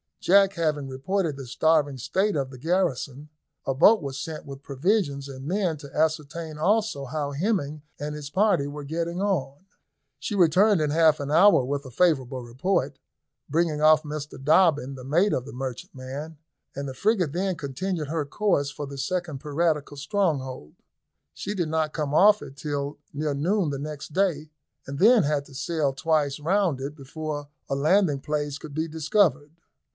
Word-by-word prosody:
Jack 195 +1 +5
having 155 -5 -1
reported 150 +5 -1
the 135 -2 -8
starving 145 +1 +2
state 190 - 0
of 135 -2 -2
the 130 - -10
garrison, 150 -3 -1 0.4
a 135 - 0
boat 205 +9 +5
was 135 -1 -4
sent 155 -2 -6
with 135 -1 -9
provisions 140 -1 0
and 135 -1 -9
men 180 -3 0
to 140 -2 -12
ascertain 155 0 -1
also 210 -5 +1
how 145 +1 -3
Hemming 155 -2 -1 0.2
and 150 +1 -4
his 150 -1 -7
party 190 -4 +2
were 145 0 -7
getting 170 +4 -3
on. 175 -9 -1 0.6
She 210 - -3
returned 190 +3 +4
in 150 -1 +1
half 160 -1 +4
a 140 0 -4
hour 170 -2 +6
with 140 +2 -3
a 130 - -9
favourable 135 -4 +1
report, 135 +2 -1 0.5
bringing 155 0 +1
off 155 0 +6
Mr 150 -2 -6
Dobbin, 150 -3 +3
the 130 -1 -9
mate 170 +10 +2
of 125 - -1
the 140 - -9
merchantman, 135 +4 -6 0.4
and 140 0 -4
the 135 - -5
frigate 190 - +1
then 185 +1 0
continued 160 +2 -3
her 155 0 -2
course 145 -3 0
for 145 0 -6
the 140 0 -8
second 175 -3 -2
piratical 150 0 -1
stronghold. 140 - -2 0.6
She 205 +1 -5
did 175 -5 -1
not 155 -1 0
come 150 -3 -2
off 205 +5 +6
it 135 - -10
till 145 0 -3
near 150 0 -2
noon 175 +5 +1
the 140 - -4
next 150 0 -7
day, 165 -5 0 0.4
and 140 +1 -6
then 230 +1 +6
had 145 -1 0
to 140 - -15
sail 150 -1 -1
twice 150 -1 0
round 175 -2 +1
it 140 +2 -5
before 145 0 -6 0.2
a 135 - 0
landing 155 +1 +3
place 145 -1 -3
could 150 - -9
be 160 +1 -1
discovered. 160 -1 +1
150 Hz, 170 wpm, -25 LUFS, 140-175 Hz, 0.6 s, hour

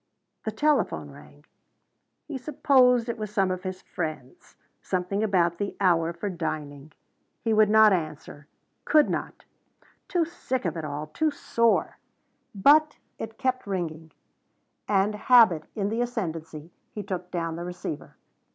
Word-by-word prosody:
The 220 - -1
telephone 295 +7 0
rang. - - -16 0.8
He 285 -4 -5
supposed 255 -3 +3
it 235 -1 -4
was 215 -1 -4
some 195 -3 +1
of 185 0 -3
his 185 0 -6
friends 155 -7 -6 0.3
something 185 +2 -2
about 175 -5 +1
the 200 - -3
hour 170 -4 +3
for 170 +4 -5
dining. 155 -5 -5 0.5
He 225 -1 +1
would 215 -1 +5
not 215 -1 +7
answer. 155 -3 -5 0.4
Could 305 -1 +4
not. - - -5 0.6
Too 350 -3 +1
sick 260 - -4
of 170 - -1
it 165 - -4
all 150 +1 -4
too 310 - 0
sore. 230 -5 0 0.6
But 300 +9 +5 0.2
it 225 0 -7
kept 255 -3 -1
ringing, 165 -4 -4 0.8
and, 200 +1 +2
habit 210 -8 +5
in 200 -2 -1
the 225 +2 -1
ascendency, 165 -9 -4 0.2
he 210 - -6
took 180 -2 -5
down 165 -2 -3
the 170 - -5
receiver. 175 -4 -6
195 Hz, 140 wpm, -26 LUFS, 165-230 Hz, 0.8 s, not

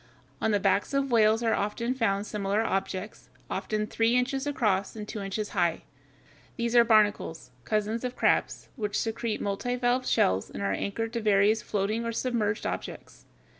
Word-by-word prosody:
On - - +2
the 205 -1 +2
backs 200 +6 +1
of 275 -1 0
whales 220 0 +4
are 215 -2 +1 0.2
found 210 -5 0
similar 210 0 -1
objects, 195 -1 -3 0.2
often 215 0 -1
three 225 +2 +1
inches 265 +3 0
across 210 -9 0
and 210 -1 -6
two 210 - -5
inches 200 +2 -3
high. 170 -2 0 0.7
These 235 0 -1
are 240 - +8
barnacles, 210 - +2
cousins 215 +2 -1
of 250 -1 -2
the - - -28
crabs, - - +1
which 210 -4 -2
secrete 225 0 -2
multivalve 245 +5 0
shells 95 +1 +2
and 100 - -6
are 100 0 0
anchored 225 - -3
to 235 - -2
various 210 +1 +3
floating 215 +3 -1
or 230 0 -3
submerged 220 -4 -1
objects. - - -6
215 Hz, 165 wpm, -28 LUFS, 200-235 Hz, 0.7 s, are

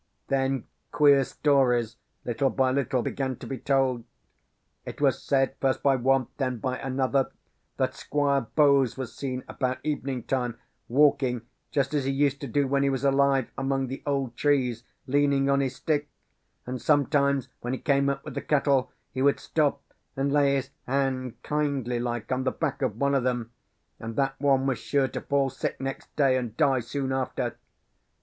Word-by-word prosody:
Then, 135 -2 0 0.3
queer 145 -2 +5
stories, 125 -5 +2 0.3
little 135 +3 +1
by 130 -1 +1
little, 130 -2 0
began 135 -1 -2
to - - -10
be 135 -2 -5
told. 135 -4 +1 0.8
It - - -8
was - - +2
said, 135 -1 +1
first 135 -1 +1
by 140 -1 +4
one, 130 +1 +2
then 130 -3 -1
by 125 +2 -3
another, 135 0 0 0.5
that - - 0
Squire 140 -4 0
Bowes 140 -5 +4
was 130 -3 -5
seen, 130 -2 -4
about 130 -1 -2
evening 135 -4 -2
time, 125 -3 -2 0.3
walking, 135 -3 +3 0.3
just 140 -1 0
as 145 -3 0
he 135 - +1
used 140 0 +1
to 140 - -4
do 140 +3 +1
when 140 +1 +1
he 140 - +3
was 135 -1 -2
alive, 140 -2 +3
among 135 -1 -1
the 135 - -6
old 135 -4 -1
trees, 125 -5 +1 0.2
leaning 140 0 +2
on 140 - +3
his 135 -2 -1
stick; 150 0 -1 0.6
and, 125 0 -5
sometimes 140 -2 +2
when 120 +1 -3
he - - -1
came 140 -1 +2
up 135 0 -3
with - - -6
the - - -3
cattle, 140 -3 +2 0.2
he 130 - -2
would 140 +1 +3
stop 145 -3 0 0.3
and 140 +1 0
lay 140 -1 +4
his 135 0 -3 0.2
hand 130 -2 -1
kindly 140 -5 -1
like 120 -1 -3
on 130 0 0
the 130 - +2
back - - -3
of 120 -6 -1
one 140 +2 +1
of 135 -2 +2
them; 120 -2 -1 0.5
and 115 0 -6
that 135 -1 +1
one 135 -2 +3
was 135 -3 0
sure 140 -2 +1
to - - -5
fall 140 -1 +1
sick 135 - -4
next 135 0 -6
day, 135 -3 +3
and 120 -3 -4
die 135 -4 +3
soon 130 +3 -3
after. 130 -1 -2
135 Hz, 180 wpm, -27 LUFS, 130-140 Hz, 0.8 s, queer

